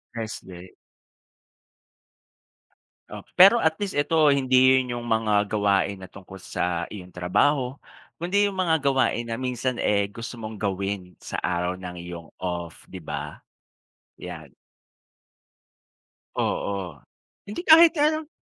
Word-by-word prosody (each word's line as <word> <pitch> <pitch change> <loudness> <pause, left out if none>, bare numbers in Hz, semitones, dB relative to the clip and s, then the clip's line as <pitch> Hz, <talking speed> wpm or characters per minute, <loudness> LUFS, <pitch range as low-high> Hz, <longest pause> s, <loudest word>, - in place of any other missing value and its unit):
Rest 110 -4 -6
day. 90 0 -11 2.4
Oh, - - -9
pero 195 +6 +8
at 160 -8 +2
least 200 -6 -3
ito, 155 +1 +3
hindi 130 -1 +4
yun 125 -2 -1
yung 120 0 -5
mga 105 -2 +1
gawain 100 -1 +1
na 95 - -10
tungkol 95 +1 -12
sa 85 -2 -2
iyong 90 -3 -9
trabaho 125 +10 +1 0.5
kundi 200 +4 +2
yung 200 - -1
mga 160 -4 +1
gawain 130 -3 +1
na 115 - -3
minsan, 125 -1 -2
eh, 100 -1 +2
gusto 115 +3 -7
mong 110 -2 -8
gawin 95 -2 -3
sa - - -4
araw 90 +1 -1
ng 90 -1 -7
iyong 85 -2 -8
off 85 -2 -5
'di 95 - -7
ba? 75 -3 -6 0.8
'Yan. 80 -6 -9 1.9
Oo, 95 -7 -2 0.5
hindi 210 - -4
kahit 330 +1 +7
ano 305 +1 +1
105 Hz, 125 wpm, -25 LUFS, 90-140 Hz, 2.4 s, pero